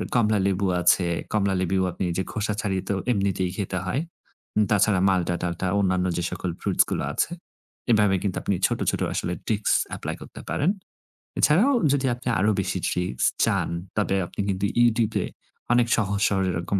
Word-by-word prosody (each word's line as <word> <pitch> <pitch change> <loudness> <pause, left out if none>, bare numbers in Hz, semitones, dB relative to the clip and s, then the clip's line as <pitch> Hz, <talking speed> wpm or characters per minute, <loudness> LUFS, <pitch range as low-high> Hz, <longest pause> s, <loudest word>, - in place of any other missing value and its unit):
কমলালেবু 100 -4 +2 0.2
আছে, 90 +1 +4 0.3
কমলালেবুও 95 -2 +1
আপনি 90 +2 -3
যে 95 - 0
খোসা 105 -1 -1
ছাড়িয়ে 95 -2 -1
তো 100 - +1 0.2
এমনিতেই 95 -3 0
খেতে 95 -2 -2
হয়। 125 +10 -1 0.6
উম 105 - +5
তাছাড়া 100 -2 +3
মাল্টা-টাল্টা 90 -1 -1
অন্যান্য 95 -2 +1
যে 85 - -1
সকল 90 0 -3
ফ্রুটস 100 -3 +3
গুলো - - -1
আছে, - - 0 0.6
এভাবে 105 -3 +4
কিন্তু 95 -3 -1
আপনি 100 - 0
ছোট, - - -3
ছোট - - -3
আসলে 90 - -2
tricks 105 -2 +1 0.2
apply - - -4
করতে - - -10
পারেন। 160 +6 +1 0.7
এছাড়াও 190 - +4 0.2
যদি 140 -1 +1
আপনি 125 - -11
আরো 105 +3 +3
বেশি - - -2
ট্রিকস 90 -9 -1 0.2
চান - - 0 0.3
তবে 105 -2 +1
আপনি - - -5
কিন্তু 95 +1 0 0.2
YouTube 115 -2 +2
এ - - -2 0.5
অনেক 120 -1 +3
সহজ-সরল 100 -2 +1
এরকম 85 +3 -1
100 Hz, 160 wpm, -25 LUFS, 95-105 Hz, 0.7 s, উম